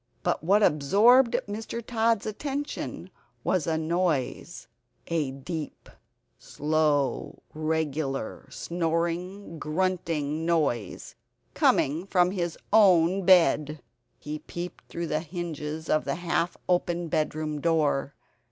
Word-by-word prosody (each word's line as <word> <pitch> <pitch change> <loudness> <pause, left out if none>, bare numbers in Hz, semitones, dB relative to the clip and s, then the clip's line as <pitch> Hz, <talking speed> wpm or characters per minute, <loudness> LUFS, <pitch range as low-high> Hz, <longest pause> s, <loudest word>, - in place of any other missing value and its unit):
But - - 0
what 200 +5 +4
absorbed 215 - +5
Mr. 220 +2 -5
Tod's 230 -2 +1
attention 280 +7 -4 0.3
was 180 -5 0
a 160 -1 +1
noise, 165 -1 -1 0.4
a 160 -5 -1
deep 150 +4 -7 0.5
slow 150 -2 0
regular 155 -5 -2
snoring 170 +3 -3
grunting 160 -3 -1
noise, 150 -10 -1 0.4
coming 160 +7 +2
from 180 -2 +3
his 175 -4 -3 0.2
own 190 -3 +5
bed. 155 -5 +4 0.4
He 150 +1 -6
peeped 175 +3 -7
through 170 - -4
the 155 -1 -1
hinges 160 -2 -5
of 155 - +2
the - - -1
half 175 0 -1
open 175 -1 0
bedroom 155 -1 -2
door. 150 -4 +1
165 Hz, 105 wpm, -27 LUFS, 155-185 Hz, 0.5 s, absorbed